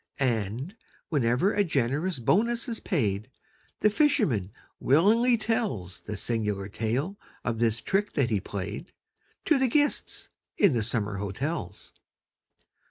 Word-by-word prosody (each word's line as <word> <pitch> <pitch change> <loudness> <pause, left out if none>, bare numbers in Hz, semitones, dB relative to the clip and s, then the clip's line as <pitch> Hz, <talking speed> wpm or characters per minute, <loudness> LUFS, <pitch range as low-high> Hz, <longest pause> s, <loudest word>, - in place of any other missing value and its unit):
And, 125 - -1 0.3
whenever 135 - +2
a 205 - +3
generous 150 +2 0
bonus 230 - +2
is 230 -2 -3
paid, 110 - -1 0.5
The 210 - +4
fisherman 210 - +2 0.3
willingly 225 - +4
tells 215 - -2
The 105 -1 -6
singular 105 -3 -1
tale 125 - -2 0.3
of 115 -2 -1
this 115 -1 +1
trick 205 +2 0
that 130 -5 +1
he 105 -3 +1
played, 100 - -6 0.5
To 305 -4 +4
the 265 - +3
guests 290 +4 0 0.3
in 200 -8 +5
the 115 - +1
summer 105 -3 -1
hotels. 100 - -4
130 Hz, 125 wpm, -27 LUFS, -, 0.5 s, in